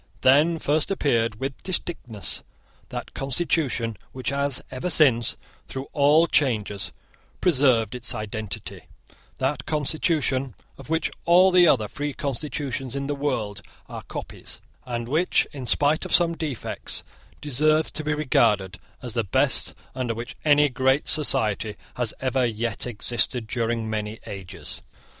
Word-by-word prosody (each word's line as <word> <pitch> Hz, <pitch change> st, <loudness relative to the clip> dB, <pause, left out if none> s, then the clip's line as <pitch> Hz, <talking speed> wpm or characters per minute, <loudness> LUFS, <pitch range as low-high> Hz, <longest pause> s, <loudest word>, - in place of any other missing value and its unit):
Then 150 Hz, +6 st, +5 dB
first 155 Hz, 0 st, +1 dB
appeared 115 Hz, -, +1 dB
with 135 Hz, 0 st, -4 dB
distinctness 165 Hz, -, -1 dB, 0.5 s
that -, -, -6 dB
constitution 135 Hz, -, 0 dB, 0.2 s
which 130 Hz, -1 st, -3 dB
has 140 Hz, -1 st, 0 dB
ever 130 Hz, +7 st, -3 dB
since, 130 Hz, -9 st, +4 dB, 0.3 s
through 135 Hz, +1 st, -6 dB
all 150 Hz, +2 st, +5 dB
changes, 110 Hz, -, 0 dB, 0.5 s
preserved 130 Hz, -, +3 dB
its 125 Hz, -1 st, -2 dB
identity; 110 Hz, -1 st, -5 dB, 0.5 s
that 135 Hz, +1 st, -1 dB
constitution 145 Hz, -, 0 dB, 0.2 s
of -, -, -13 dB
which 160 Hz, 0 st, 0 dB
all 180 Hz, +2 st, +6 dB
the 180 Hz, -1 st, +6 dB
other 110 Hz, -8 st, +3 dB
free 145 Hz, +6 st, -4 dB
constitutions 135 Hz, -1 st, -3 dB
in 140 Hz, 0 st, -2 dB
the 145 Hz, -, -1 dB
world 120 Hz, -8 st, -2 dB, 0.3 s
are -, -, -7 dB
copies, -, -, -7 dB, 0.3 s
and 120 Hz, -1 st, -3 dB
which, 160 Hz, +7 st, +2 dB
in 135 Hz, -5 st, -7 dB
spite 145 Hz, +5 st, +2 dB
of -, -, +3 dB
some 170 Hz, -1 st, +3 dB
defects, 150 Hz, -8 st, -3 dB, 0.4 s
deserves 155 Hz, +2 st, +2 dB
to 155 Hz, -, -3 dB
be 150 Hz, 0 st, 0 dB
regarded 105 Hz, -10 st, +2 dB, 0.2 s
as 120 Hz, -3 st, -2 dB
the 115 Hz, -1 st, +1 dB
best 95 Hz, -, +1 dB, 0.2 s
under 125 Hz, -3 st, -2 dB
which 120 Hz, +5 st, -6 dB
any 150 Hz, -1 st, +5 dB
great 130 Hz, +1 st, +1 dB
society 110 Hz, -8 st, +1 dB, 0.2 s
has 120 Hz, -3 st, -1 dB
ever 130 Hz, 0 st, +1 dB
yet 115 Hz, -1 st, -1 dB
existed 120 Hz, +1 st, 0 dB
during 115 Hz, 0 st, -1 dB
many 110 Hz, 0 st, -3 dB
ages. 95 Hz, -3 st, -7 dB
130 Hz, 135 wpm, -25 LUFS, 115-150 Hz, 0.5 s, all